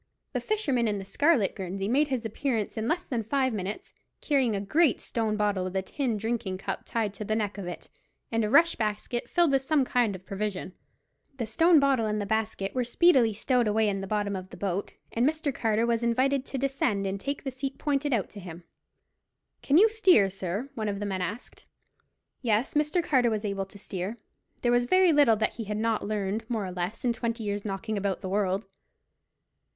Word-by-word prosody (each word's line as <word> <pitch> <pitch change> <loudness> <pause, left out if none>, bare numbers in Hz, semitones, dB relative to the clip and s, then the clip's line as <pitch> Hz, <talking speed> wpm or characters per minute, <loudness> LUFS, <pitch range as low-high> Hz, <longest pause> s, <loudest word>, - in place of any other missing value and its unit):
The - - -1
fisherman 280 - 0
in 210 -1 0
the 195 - -6
scarlet 240 - +2
guernsey 195 +1 -4
made 280 +7 +3
his 255 -4 -2
appearance 225 -1 -2
in 220 0 -2
less 350 +5 0
than 240 -4 -2
five 260 +2 0
minutes, 200 0 -5 0.3
carrying 265 -7 +1
a - - -1
great 295 +10 +2
stone 220 -2 -2
bottle, 205 -3 +1
with 185 +1 -5
a 190 - 0
tin 245 +1 -2
drinking 220 -3 -2
cup - - -4
tied 220 -4 -1
to 210 - -6
the 215 +1 -1
neck 210 -2 -2
of 185 - -5
it, 175 - -7 0.4
and 225 -1 +1
a 210 - 0
rush 335 +8 +5
basket 215 +2 -3
filled 345 -4 +3
with 270 -1 +3
some 275 0 +2
kind 240 -5 +1
of 185 0 -11
provision. 195 -2 -4 0.6
The 235 - -2
stone 325 +9 +5
bottle 270 -5 +2
and 210 0 -1
the 205 - -2
basket 215 -2 -1
were 255 - 0
speedily 245 -2 +4
stowed 240 +2 +1
away 215 +1 +2
in 195 -1 -1
the 195 - -5
bottom 205 -1 -1
of 185 0 -6
the - - -11
boat, 195 0 -2 0.2
and 235 - 0
Mr. 310 -3 -2
Carter 225 -1 +1
was 235 -1 +1
invited 260 +3 +1
to 270 - -4
descend 260 -7 0
and 195 +1 -2
take 280 +6 -4
the 270 - -3
seat 265 +1 -5
pointed 290 -1 0
out 225 -7 +1
to 205 - -9
him. 175 -2 -9 1.0
"Can 285 - +3
you 420 +5 +8
steer, 370 - +4
sir?" 195 +7 -4
one 215 -2 -2
of 200 -1 -3
the 205 - -3
men 190 -2 -2
asked. 205 +7 -6 0.7
Yes, 225 0 +1
Mr. 300 +4 +1
Carter 255 -6 +3
was 215 -1 -2
able 195 -1 -2
to 205 - -13
steer. 195 +2 -5 0.5
There 240 - +3
was 245 0 +3
very 370 +4 +5
little 285 -6 +5
that 215 +1 -1
he 225 - -4
had 210 +1 -3
not 220 -1 0
learned 210 +1 -2
more 220 -4 -1
or 185 - -5
less 180 +7 -4
in 240 - +3
twenty 230 -1 -3
years' 205 -1 -2
knocking 210 +1 -3
about 195 -1 -2
the 190 - -4
world. 195 0 0
220 Hz, 215 wpm, -28 LUFS, 200-265 Hz, 1.0 s, you